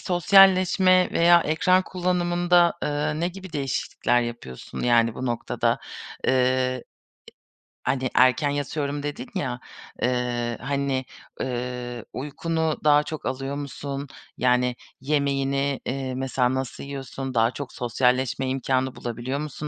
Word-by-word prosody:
sosyalleşme 185 0 +5
veya 170 0 +6
ekran 180 +4 +3
kullanımında, 175 -1 +2
eee, 150 +1 -1
ne 175 - +1
gibi 190 -1 -10
değişiklikler 135 -3 0
yapıyorsun, 120 - -6
yani, 115 -2 +3
bu 130 - -4
noktada? 120 -1 0 0.5
Eee, - - +4
e 130 -1 +1 1.1
hani, 130 -1 -1
erken 130 +3 +4
yatıyorum 145 0 -2
dedin 145 -3 -5
ya. 125 -3 -2 0.4
Eee, 120 -1 -1
hani, 135 -1 -1 0.4
eee, 125 -1 -4
uykunu 160 +3 -2
daha 150 -1 +5
çok 155 +1 -7
alıyor 135 +2 -3
musun? 140 0 -5 0.3
Yani, 125 0 +2 0.3
yemeğini, 140 -1 0
eee, 130 -1 -3
mesela 130 -1 0
nasıl 130 -1 -4
yiyorsun? 135 -1 -6
Daha 115 +1 +3
çok 140 -2 -7
sosyalleşme 125 +2 0
imkânı 130 0 0
bulabiliyor 120 +4 -4
musun 150 0 -5
135 Hz, 120 wpm, -24 LUFS, 125-150 Hz, 1.1 s, veya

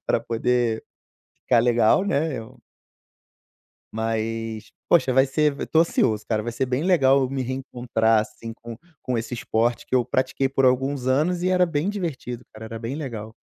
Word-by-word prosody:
pra - - +2
poder 115 -1 0 0.6
ficar 125 - +3
legal, 120 - +3
né, 155 -6 0
eu 110 -1 -11 1.3
Mas, 110 0 -3 0.2
poxa, 130 -7 +4
vai 130 +1 +4
ser 150 +2 +1
v - - -5
tô 160 - +3
ansioso, 110 -10 +1
cara, 110 -2 0
vai 120 - -4
ser 130 +3 -1
bem 125 +3 -1
legal 140 -7 +4
eu 130 -1 -1
me 135 -1 -2
reencontrar, 120 -4 0
assim, 115 +1 -7
com 115 0 -10 0.3
com 125 - -2
esse 115 +2 -4
esporte 115 0 -1
que - - -3
eu 125 -1 +3
pratiquei 130 +2 0
por 135 0 +1
alguns 130 +1 +1
anos 160 +7 +1
e 185 - +1
era 180 -1 +4
bem 165 0 -1
divertido, 145 - -4
cara, 110 0 -10
era 115 0 -7
bem 115 +3 -4
legal. 115 -8 -6
125 Hz, 180 wpm, -24 LUFS, 115-140 Hz, 1.3 s, poxa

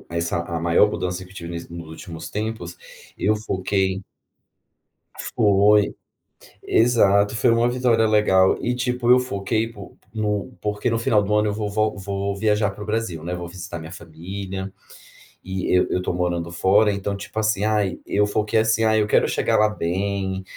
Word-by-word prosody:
o - - -25
essa 85 0 -1
a 85 -1 -4
maior 85 +5 +4
mudança 90 0 -3
que 90 - -17
eu - - -16
tive 85 -3 -7
ness 85 0 -7
nos 85 -1 -8
últimos 80 0 -8
tempos, 105 -5 -4 0.4
eu 105 +2 +2
foquei 95 -2 -1 1.4
Foi, 105 0 +4 0.7
exato, 105 -3 +3
foi 110 - +2
uma 115 +1 +3
vitória 120 -2 +2
legal. 95 -3 +4
E 125 - -1
tipo, 125 -1 -1
eu 125 +1 +7
foquei 110 -1 -1
pôn 100 -3 -12 0.2
no 105 +1 -2
porque 105 +2 -1
no 115 - 0
final 110 -2 +2
do 100 +1 -2
ano 105 0 +3
eu - - -2
vou 105 -1 -3
vol 110 +1 0
vou 100 0 -3
viajar 105 -1 +1
para 105 - -10
o - - -7
Brasil, 110 -7 -2
né, 90 +2 -3
vou 90 0 -6
visitar 85 -1 -7
minha 80 +1 -9
família, 95 +3 -7 0.7
e 95 0 -3
eu 90 - +4
eu - - 0
estou 90 - -2
morando 85 -1 -2
fora, 100 +5 +3
então, 100 0 -3
tipo, 100 +2 -6
assim, 105 -2 +1
ai, 105 -3 +1
eu 105 +1 +2
foquei 105 +1 +1
assim: 110 0 +2
“Ai, 110 -1 +3
eu 105 - 0
quero - - +3
chegar - - +1
lá 105 0 +4
bem, 95 0 -2
100 Hz, 185 wpm, -22 LUFS, 90-110 Hz, 1.4 s, eu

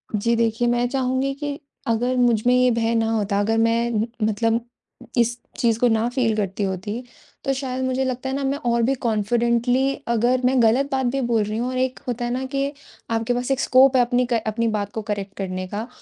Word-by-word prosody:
जी, 230 +3 +1
देखिए, 230 +1 +1
मैं 240 0 +2
चाहूँगी 260 +1 0
कि 285 0 -5 0.3
अगर 245 +3 +1
मुझमें 240 0 +3
ये 250 0 +4
भय 230 0 +1
ना 225 0 +1
होता, 205 -2 0
अगर 220 +2 +1
मैं 230 0 +1 0.2
मतलब 225 +2 +1 0.6
इस 240 +1 +2 0.2
चीज़ 230 -2 +1
को 245 - +4
ना 225 0 +2
फ़ील 245 -3 0
करती 200 0 -2
होती 195 +5 -3 0.4
तो 275 - +1
शायद 260 -1 -3
मुझे 260 +1 0
लगता 255 +1 -3
है 265 - -2
ना 275 - -2
मैं 275 +1 0
और 235 0 +2
भी 270 - +3
कॉन्फिडेंटली 235 +4 +1
अगर 240 +2 +2
मैं 255 -1 +3
गलत 250 +5 +3
बात 265 -1 0
भी 270 - 0
बोल 220 -2 +3
रही 215 +1 -3
हूँ 245 +2 -1
और 255 - -3
एक 255 0 -1
होता 240 0 -2
है 240 - -2
ना 260 +1 -2
कि 275 +1 -2 0.4
आपके 225 +2 0
पास 245 +2 -2
एक 270 - +1
स्कोप 265 +1 +5
है 255 - +6
अपनी 245 +1 +2
क 230 - +1
अपनी 230 +2 0
बात 205 -1 -3
को 220 - -3
करेक्ट 205 -2 -4
करने 185 -1 -4
का। 215 +5 -5
235 Hz, 215 wpm, -22 LUFS, 225-255 Hz, 0.6 s, है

